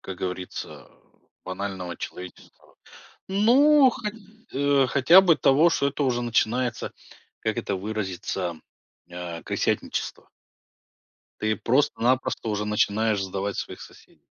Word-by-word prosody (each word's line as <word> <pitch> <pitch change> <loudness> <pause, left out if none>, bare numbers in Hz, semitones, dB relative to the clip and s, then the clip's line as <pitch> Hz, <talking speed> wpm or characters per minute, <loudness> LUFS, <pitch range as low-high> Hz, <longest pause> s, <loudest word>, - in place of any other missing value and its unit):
как 95 - -7
говорится, 90 0 -6 0.6
банального 95 -2 -5
человеческого. 90 -1 -10 0.5
Ну, 260 +8 +5
хоть, 210 -3 -5 0.4
э, 140 -1 +3
хотя 140 +8 +6
бы 175 -4 +4
того, 150 +5 +4
что 140 -4 +1
это 140 +1 -2
уже 120 -2 0
начинается, 120 +1 0 0.5
как - - -2
это 100 - -2
выразиться, 95 -4 -4 0.5
а, 85 -1 -7
крысятничество. - - -2 1.1
Ты 110 -1 0
просто-напросто 130 -1 +1
уже 105 0 -2
начинаешь 105 0 +1
сдавать 95 +1 -3
своих - - -6
соседей. - - -16
110 Hz, 110 wpm, -25 LUFS, 95-140 Hz, 1.1 s, хотя